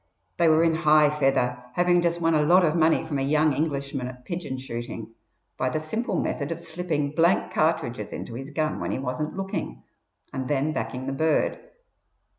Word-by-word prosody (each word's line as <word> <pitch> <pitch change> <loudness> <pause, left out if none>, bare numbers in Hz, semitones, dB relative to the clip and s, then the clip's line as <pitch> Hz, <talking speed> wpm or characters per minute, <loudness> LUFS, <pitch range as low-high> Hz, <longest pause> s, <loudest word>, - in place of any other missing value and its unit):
They 170 - +4
were 160 +1 +5
in 165 -1 +3
high 155 -2 +4
feather, 125 -3 +1
having 175 0 +3
just 170 0 0
won 165 -1 +2
a 155 - +4
lot 175 +4 +5
of 155 0 +1
money 160 -1 +3
from 145 -3 -2
a - - -1
young 150 +2 +3
Englishman 140 -3 -2
at 125 0 -10
pigeon 170 -7 -4
shooting, 120 -3 -6 0.5
by 130 - +1
the 155 - -1
simple 220 +10 -2
method 145 +1 -2
of 165 - -3
slipping 160 -4 -2
blank 170 +4 +2
cartridges 125 -9 0
into 115 - -6
his 135 +4 -6
gun 155 0 -1
when - - -3
he - - -1
wasn't 135 +6 -3
looking, 195 0 -4 0.5
and 130 -1 -3
then 145 +2 0
backing 125 +2 -4
the 135 - -2
bird. 155 +3 +1
150 Hz, 190 wpm, -25 LUFS, 135-165 Hz, 0.5 s, were